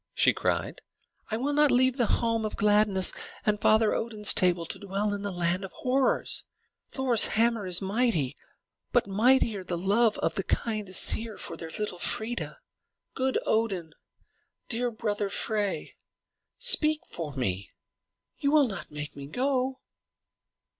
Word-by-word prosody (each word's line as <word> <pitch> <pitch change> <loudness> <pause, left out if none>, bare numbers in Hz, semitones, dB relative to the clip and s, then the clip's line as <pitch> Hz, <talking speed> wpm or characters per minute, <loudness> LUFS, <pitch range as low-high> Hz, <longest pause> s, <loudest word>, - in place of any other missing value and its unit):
she - - +4
cried. - - -2 0.5
"I 220 - -1
will 280 +5 -1
not 295 0 +4
leave 255 +1 +3
the 240 -4 +2
home 230 -1 0
of 215 - -3
gladness 205 -2 +4 0.3
and 210 -1 +1
Father 220 0 +3
Odin's 215 -3 0
table 175 -2 +2
to - - -6
dwell 200 +1 -2
in 205 - -4
the 205 - -3
land 175 +1 -1
of 190 - -8
horrors! 260 +1 +1 0.5
Thor's 255 -4 +3
hammer 225 -3 +1
is 180 +1 +1
mighty, 195 - 0 0.6
but - - +3
mightier 215 0 +2
the 180 -1 -4
love 205 +5 +2
of - - -1
the 195 - -2
kind 215 0 -2
Æsir 220 +4 +2
for - - -5
their 165 - -7
little 210 -5 -4
Freia! 230 - 0 0.6
Good 265 0 0
Odin, 195 -8 -1 0.8
dear 245 +1 0
brother 210 -3 -2
Frey, 210 -1 -1 0.6
speak 310 -11 +3
for 155 -4 -6
me! 100 -8 -2 0.7
You 280 - +1
will 295 -2 +4
not 195 -8 -7
make 150 0 -7
me 140 -1 -8
go?" 260 - -1
215 Hz, 145 wpm, -27 LUFS, 190-240 Hz, 0.8 s, she